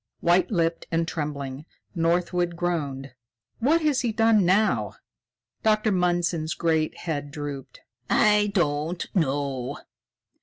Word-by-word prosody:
White 175 +1 +3
lipped 165 -4 0
and 165 0 0
trembling, 145 -3 -4 0.3
Northwood 175 0 0
groaned: 145 -6 -3 0.5
"What 310 +7 +2
has 295 -4 +2
he 240 - 0
done 225 -2 +4
now?" 210 +4 +2 0.7
Dr. 215 0 +2
Mundson's 175 -3 0
great 160 -2 0
head 145 -4 -4
drooped. 145 -3 -7 0.3
"I 210 -1 +4
don't 165 -2 0
know. 140 -4 -1
170 Hz, 110 wpm, -25 LUFS, 145-195 Hz, 0.7 s, done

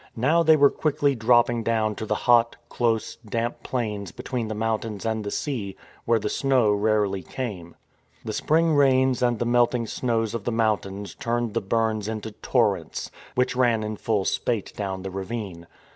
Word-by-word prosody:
Now 150 +9 +3
they 160 -1 +6
were 140 -2 +5
quickly 145 -2 +1
dropping 120 0 +3
down 110 -1 0
to 110 - -5
the - - +1
hot, 120 -1 +4
close, 115 -2 -1
damp 115 +1 -3
plains 105 -7 -3
between 120 +1 -4
the 110 - -4
mountains 110 -1 -2
and 110 -1 -1
the 100 - -3
sea, 105 -7 -3 0.3
where 115 0 +3
the 105 -1 -3
snow 130 -2 +2
rarely 105 -2 +1
came. 90 -4 -6 0.5
The 110 - -3
spring 160 +7 +2
rains 130 -3 +3
and 120 -1 +2
the 120 - -1
melting 120 0 +2
snows 115 -1 -1
of 115 -3 -4
the 120 - -1
mountains 105 -3 -1
turned 120 -3 -2
the 115 - 0
burns 110 0 0
into 110 0 -4
torrents, - - -1 0.2
which 125 0 +1
ran 120 -3 +2
in 110 0 -3
full 105 -2 -1
spate 115 -5 -1
down 95 -2 -4
the 95 - -5
ravine. 95 -3 -5
115 Hz, 175 wpm, -25 LUFS, 105-120 Hz, 0.5 s, they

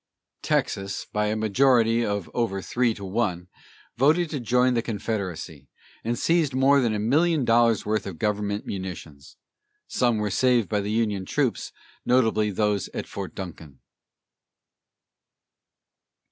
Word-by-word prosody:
Texas, 95 0 -1
by 105 0 -1
a 105 - 0
majority 115 +1 +3
of 100 -5 -2
over 115 -5 -1
three 120 +3 0
to 100 - -8
one, 95 -4 -2 0.5
voted 155 +6 +3
to 145 - -2
join 125 +2 +2
the 115 - +1
Confederacy, 95 - -5 0.3
and 120 +1 -1
seized 165 -6 +1
more 135 +1 +4
than 115 -3 +1
a - - -2
million 150 +6 +2
dollars' 115 -1 +3
worth 105 -1 -1
of 95 -4 -7
government 105 +2 -1
munitions. 80 -7 -7 0.5
Some 120 -3 +1
were 105 -1 -1
saved 125 0 +2
by 105 -2 0
the 100 - -4
Union 105 -3 0
troops, - - -1 0.3
notably 110 -4 +2
those 105 0 0
at - - -3
Fort - - -7
Duncan. 80 -7 -9
110 Hz, 135 wpm, -25 LUFS, 100-120 Hz, 0.5 s, more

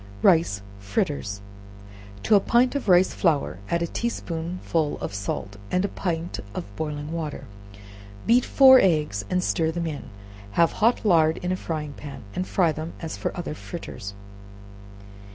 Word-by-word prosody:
Rice 160 - +4 0.2
Fritters. 105 - -2 0.8
To 220 - +2
a 205 - +8
pint 240 +5 +3
of 280 -7 -2
rice 180 +1 +5
flour 145 - +1
add 170 0 +1
a - - +1
tea 235 +7 -2
spoonful 165 -4 -2
of - - -5
salt 100 0 -4
and 185 +2 +1
a - - -2
pint 170 -2 -3 0.2
of 100 +3 -6
boiling 150 -1 -4
water; 155 -4 -4 0.8
beat 240 +2 +5
four 265 -1 +8
eggs 150 - +1
and 180 0 +1
stir 165 -3 +1
them 170 +1 -2
in, 155 -3 -4 0.5
have 170 -1 +4
hot 230 +1 +2
lard 160 -5 +4
in 180 - 0
a - - +1
frying 155 -5 -4
pan, 135 -3 -9
and 185 - -2
fry 175 -4 +2
them 155 +2 -5
as 165 -1 -6 0.2
other 175 -4 -4
fritters. 125 - -7
165 Hz, 155 wpm, -25 LUFS, 150-185 Hz, 0.8 s, a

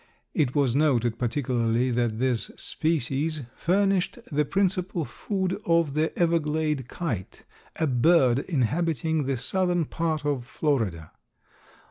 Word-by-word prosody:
It 140 -3 +1
was 135 -4 +2
noted 120 -6 +2
particularly 120 -1 0
that 120 -2 0
this 125 -1 0
species 155 0 -1
furnished 195 +4 +1
the 150 +1 +2
principal 185 -2 0
food 190 +2 -3
of 165 -4 +2
the 155 +2 +1
Everglade 155 -5 +1
Kite, 125 - -5 0.3
a 160 - 0
bird 130 -1 +4
inhabiting 160 - 0
the 135 -1 0
southern 175 +4 0
part 160 -1 -2
of 140 -4 0
Florida. 115 - -1
150 Hz, 115 wpm, -26 LUFS, 125-170 Hz, 0.3 s, bird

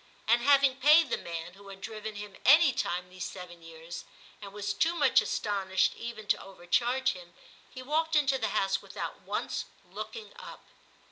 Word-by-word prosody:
And 235 +2 +4
having 275 0 +4
paid 300 +2 +6
the - - +1
man, 170 +1 -6
who 200 +1 -15
had 195 -1 -10
driven 215 +1 -6
him 205 -1 -8
any 295 +2 +7
timfe 180 -3 -2
these 185 -1 -7
seven 175 -2 -8
years, 165 +1 -9 0.4
and 200 -1 -8
was 205 0 -3
too 325 +12 +1
much - - +4
astonished 190 -2 0
even 230 -2 -7
to - - +2
overcharge 240 +8 0
him, 175 -3 -12 0.3
he 255 - -9
walked 320 +4 0
into 275 -3 +3
the - - 0
house 195 0 0
without - - -7
once - - -3 0.3
looking 460 0 -7
up. - - -11
210 Hz, 175 wpm, -29 LUFS, 190-270 Hz, 0.4 s, any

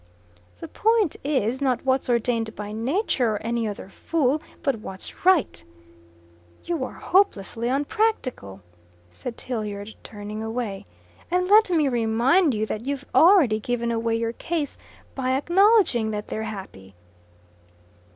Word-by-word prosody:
"The - - -6
point 440 -6 +1
is, 260 -3 0
not 260 -2 0
what's 260 -1 +1
ordained 230 -2 0
by 210 0 -6
nature 245 - 0
or 205 - -4
any 230 0 -1
other 205 -2 -6
fool, 295 - 0 0.2
but 275 -4 +1
what's 190 - -9
right." 300 - +3 1.0
"You 335 -6 -2
are - - -5
hopelessly 235 - +1
unpractical," 270 - -1 0.5
said 235 - -7
Tilliard, 210 -3 -5
turning 210 0 -7
away. 220 -3 -4 0.4
"And 360 +1 +1
let 425 +1 +6
me 320 -5 +2
remind 245 +6 +2
you 215 +1 0
that 220 +3 -5
you've 280 0 -3
already 320 - +6
given 235 +1 -2
away 230 0 0
your 230 0 -1
case 320 +2 -3 0.4
by 260 -1 -1
acknowledging 355 - +3
that 210 -1 -5
they're 220 - -3
happy." 100 - -10
245 Hz, 130 wpm, -24 LUFS, 220-300 Hz, 1.0 s, let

